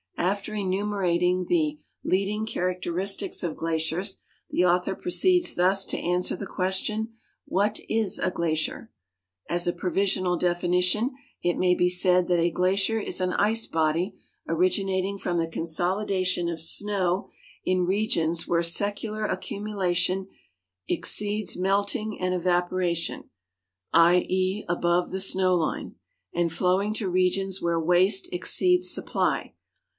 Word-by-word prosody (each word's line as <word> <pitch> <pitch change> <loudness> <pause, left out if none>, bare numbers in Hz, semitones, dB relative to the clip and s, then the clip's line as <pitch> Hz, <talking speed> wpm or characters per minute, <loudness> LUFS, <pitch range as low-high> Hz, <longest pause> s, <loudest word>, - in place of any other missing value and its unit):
After 200 +4 -1
enumerating 185 -3 0
the 305 -3 0 0.2
"leading 205 +3 0
characteristics 185 0 -1
of 170 -3 -2
glaciers," 165 +4 -1 0.3
the 180 - +2
author 180 +2 +2
proceeds 360 0 +2
thus 190 +2 +2
to - - -2
answer 180 +1 0
the 195 +1 -6
question, 210 +4 -2 0.2
" - - -40
What 205 +3 0
is 220 -4 0
a - - 0
glacier? 165 +6 -2 0.3
" 90 0 -37
"As 175 0 -1
a 175 - +2
provisional 185 -1 0
definition, 180 +7 +1 0.3
it 175 0 +1
may 180 -1 +3
be 180 0 +2
said 180 0 +3
that 175 -1 +3
a 170 +1 +3
glacier 190 +6 +1
is 200 - -3
an 180 0 0
ice 220 +2 +1
body 165 +4 0 0.3
originating 190 +3 0
from 175 -2 -2
the 165 -1 0
consolidation 180 +2 0
of 165 -2 -3
snow 190 +1 +1 0.3
in 185 -1 +1
regions 175 -4 0
where 170 0 +1
secular 205 +5 -1
accumulation 190 -2 -1 0.6
exceeds 205 - 0
melting 200 +3 0
and 185 0 0
evapo 175 0 +1
ration, 175 -2 -2 0.6
I. 170 +2 +5
e., 185 +2 -1
above 175 0 +1
the 190 +1 -2
snow 185 -1 +3
line, 165 -3 -2 0.4
and 170 -1 0
flowing 190 +5 +1
to 205 -4 -2
regions 185 +1 0
where 170 -1 +1
waste 180 - +3
exceeds 360 0 +2
supply - - -1
185 Hz, 130 wpm, -26 LUFS, 175-200 Hz, 0.6 s, I